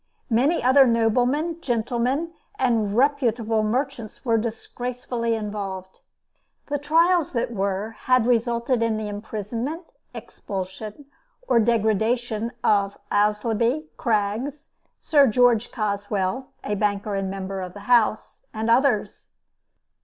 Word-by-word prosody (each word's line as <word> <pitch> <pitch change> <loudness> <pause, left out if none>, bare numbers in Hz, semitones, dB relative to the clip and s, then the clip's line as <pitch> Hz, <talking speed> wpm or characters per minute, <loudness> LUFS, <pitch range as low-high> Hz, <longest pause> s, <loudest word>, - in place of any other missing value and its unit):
Many 265 +9 +2
other 260 +1 +6
noblemen, 250 +9 +1
gentlemen, 250 +5 -1 0.2
and 225 -5 +1
reputable 240 -5 +2
merchants 240 +1 -3
were 230 -2 +3
disgracefully 235 +1 -3
involved. 200 -3 -5 0.7
The 290 0 -1
trials 330 +3 +3
that 240 0 -1
were 200 +1 -2
had 255 -2 +4
resulted 235 0 +1
in 225 -1 +1
the 215 -1 -4
imprisonment, 225 - -4 0.3
expulsion 200 +6 -7 0.4
or 235 - +4
degradation 225 +1 +1
of 200 -1 +2
Aislabie, 225 +8 +1
Craggs, 235 +7 -1 0.3
Sir 285 -3 +4
George 240 0 +3
Caswell 205 +2 -2 0.2
(a 210 - -2
banker 205 0 -1
and 195 -1 -1
member 195 0 -4
of 180 -1 -6
the 205 - -9
House,) 220 -1 +1
and 220 +1 0
others. 245 -3 +1
230 Hz, 110 wpm, -24 LUFS, 210-255 Hz, 0.7 s, other